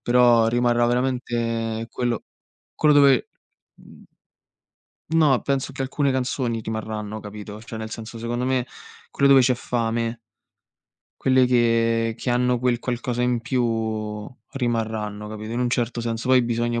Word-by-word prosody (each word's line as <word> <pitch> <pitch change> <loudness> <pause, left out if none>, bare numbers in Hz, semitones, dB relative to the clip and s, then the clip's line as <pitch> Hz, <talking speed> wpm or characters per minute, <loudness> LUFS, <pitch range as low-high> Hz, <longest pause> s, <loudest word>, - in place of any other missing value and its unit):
però 120 -2 +4
rimarrà 120 0 +2
veramente 115 -2 -1
quello 120 -2 -2 0.5
quello 150 -1 +4
dove 140 -3 +5 0.5
mhmm - - -17 1.0
No, 155 -6 +3
penso 135 -1 -1
che 135 - -4
alcune 135 +1 0
canzoni 125 -3 -1
rimarranno, 110 -1 -5
capito. 105 0 -9
Cioè 115 0 -8
nel 110 0 -6
senso 115 +1 -8
secondo 120 +2 -2
me 130 -1 +1 0.5
quelle 140 - +2
dove 135 -1 +7
c'è 125 0 +3
fame 115 -1 -2 1.0
quelle 130 -1 +4
che 115 -2 +2
che 125 - -3
hanno 125 0 +2
quel 125 -1 +1
qualcosa 120 0 -3
in 125 -1 +1
più 110 -3 -2 0.3
rimarranno, 110 -4 -2
capito, 110 +1 -7
in 120 - -2
un 125 - +1
certo 120 -1 -1
senso. 115 +1 -3
Poi 130 -1 +6
bisogna 120 0 -1
120 Hz, 140 wpm, -23 LUFS, 115-125 Hz, 1.0 s, dove